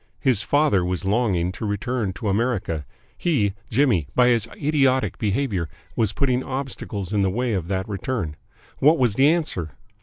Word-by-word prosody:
His 125 -7 +2
father 145 -7 +2
was 90 +1 -2
longing 95 -5 +1
to 95 - -8
return 105 +1 -1
to 105 - -5
America 100 - -1 0.3
he, 120 - +1 0.2
Jimmy, 115 - +2
by 125 -1 +5
his 115 -2 +2
idiotic 135 -3 +1
behaviour 105 - -1 0.3
was 110 -3 +1
putting 130 0 0
obstacles 125 -7 -5
in 105 - +2
the 95 - +2
way 120 +4 -1
of 90 -4 -2
that 95 0 -2
return 100 -5 -3 0.4
what 155 +4 +5
was 125 -6 +2
the 135 +6 +4
answer? 150 - -1
110 Hz, 160 wpm, -23 LUFS, 95-130 Hz, 0.4 s, by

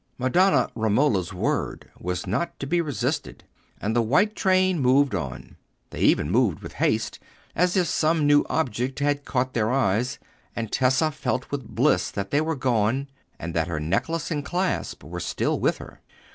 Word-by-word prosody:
Madonna 130 +2 +3
Romola's 110 - +1
word - - -2
was 90 0 -3
not 170 - -2
to - - -4
be 170 +5 +1
resisted, 145 -10 -3 0.4
and 110 +3 -2
the 120 - +4
white 150 - +2
train 185 -3 +2
moved 135 0 +3
on. 70 -10 -5 0.3
They - - -7
even 75 +3 +3
moved 110 -8 +2
with - - -9
haste, - - 0 0.4
as 180 +2 +2
if 180 - +3
some 160 -1 +1
new 145 0 +5
object 130 -3 -1
had 145 0 0
caught 130 0 -1
their 110 -2 +1
eyes; 125 -1 +1 0.4
and 115 -2 -4
Tessa 130 +4 +2
felt 130 -2 -3
with 135 -5 -4
bliss - - +2
that 100 0 -5
they 145 - +3
were 160 +1 -1
gone, 130 +1 0 0.3
and 85 0 -6
that 85 -1 0
her 85 -3 -3
necklace 100 - -1
and 145 -3 -1
clasp 180 - -2
were 85 +5 -6
still - - -1
with - - +1
her. - - -12
130 Hz, 170 wpm, -25 LUFS, 105-155 Hz, 0.4 s, new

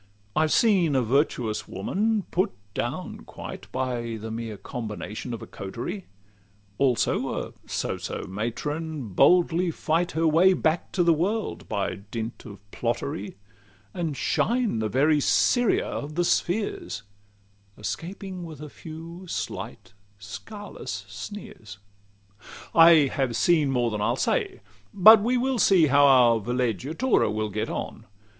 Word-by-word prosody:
I've 155 0 +2
seen 185 -10 +3
a 130 - +3
virtuous 120 -3 0
woman 205 - -1
put 190 +3 +1 0.2
down 130 - -4
quite 95 +1 -9
By 120 -3 -2
the 110 +1 -6
mere 115 -2 -5
combination 110 +2 -6
of 115 - -5
a - - -6
coterie; 120 - -6 0.7
Also 130 -4 +1
a - - -19
so - - -2
so - - -5
matron 140 - -4
boldly 175 - +4
fight 165 +2 -1
Her 165 +1 +2
way 175 +5 +5
back 160 -1 0
to 180 - +2
the 170 -1 +5
world 200 +7 -2
by - - -2
dint 115 +1 -5
of 105 -3 -9
plottery, 100 0 -3 0.6
And 160 -5 -3
shine 235 - +1
the 110 -1 -1
very 145 +6 +3
Siria 245 - +3
of 150 +1 -5
the 175 0 +1
spheres, 175 - -1 0.7
Escaping 185 - -5
with 160 -4 -9
a 150 0 -8
few 165 +5 -10
slight, 95 - -5 0.2
scarless 105 - -8
sneers. 105 - -9
LXXXIII 100 0 -19
I 165 -3 +7
have 130 -4 -1
seen 155 +1 +3
more 120 -3 +1
than 105 -1 -3
I'll 115 +3 +1
say: 395 - -1 0.3
but 215 +3 +9
we 245 +4 +1
will 255 0 0
see 185 -5 +5
How 145 0 +5
our 120 -4 +6
villeggiatura 125 - 0
will 110 0 -2
get 110 +2 -2
on. - - -5
145 Hz, 135 wpm, -26 LUFS, 110-180 Hz, 0.7 s, but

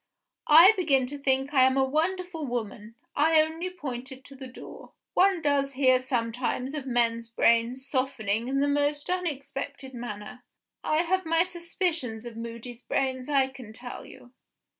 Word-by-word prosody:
I 330 +6 +9
begin 285 -9 +2
to 285 +3 -5
think 270 +1 0
I 265 - +5
am 260 +1 +4
a 270 - +4
wonderful 330 +2 -2
woman 225 -2 -5 0.2
I 315 +2 +4
only 320 +3 0
pointed 265 -6 -7
to 275 - -13
the 265 0 -9
door. 255 - -12 0.2
One 375 -3 +3
does 280 -1 +1
hear 255 -1 +4
sometimes 250 +1 -2
of 290 -3 -5
men's 235 -2 +1
brains 235 +3 +2
softening 235 -5 -1
in 275 +1 0
the 285 - +2
most 290 +2 0
unexpected 280 -5 -4
manner. 240 0 -7 0.4
I 310 +2 +2
have 375 +2 0
my 330 0 +3
suspicions 340 - -3
of 235 -1 -8
Moody's 235 +1 -8
brains, 260 0 -2
I 270 -2 +3
can 255 -5 -11
tell 245 +2 -8
you." 245 - -15
265 Hz, 160 wpm, -27 LUFS, 245-310 Hz, 0.4 s, I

